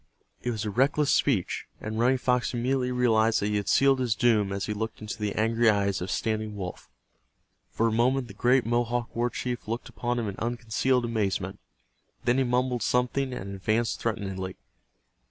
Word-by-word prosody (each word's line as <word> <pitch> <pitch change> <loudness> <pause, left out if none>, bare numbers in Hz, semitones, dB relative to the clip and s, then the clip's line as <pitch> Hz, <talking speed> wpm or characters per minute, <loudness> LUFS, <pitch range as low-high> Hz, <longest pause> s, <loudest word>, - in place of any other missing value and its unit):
It 125 - -2
was 110 -2 -2
a 105 - -2
reckless 140 +6 +2
speech, 110 -11 +1
and 110 +1 -4
Running 125 +3 +4
Fox 125 0 0
immediately 125 +1 0
realized 115 -3 +3
that 100 - -1
he 105 - +1
had 100 - -3
sealed 135 -1 +4
his 120 -4 +1
doom 110 -4 +3
as 100 0 -2
he 105 - -2
looked 110 +1 -4
into 105 0 -6
the 105 -1 -1
angry 115 +1 +3
eyes 100 -3 +1
of 90 - -4
Standing 110 0 -2
Wolf. 90 -3 -7 0.8
For 115 - 0
a - - +1
moment 125 +3 +2
the 100 - -10
great 125 +5 +3
Mohawk 120 0 -1
war 120 +1 +1
chief 120 -1 -4
looked 115 +2 -4
upon 120 0 -2
him 115 -2 -1
in 100 - -5
unconcealed 120 +2 0
amazement. 100 -4 -1 0.6
Then 125 +2 +2
he - - +3
mumbled 125 0 0
something, 125 +3 +1
and 100 -5 -5
advanced 110 +4 0
threateningly. 95 -5 -3
115 Hz, 185 wpm, -27 LUFS, 105-125 Hz, 0.8 s, Running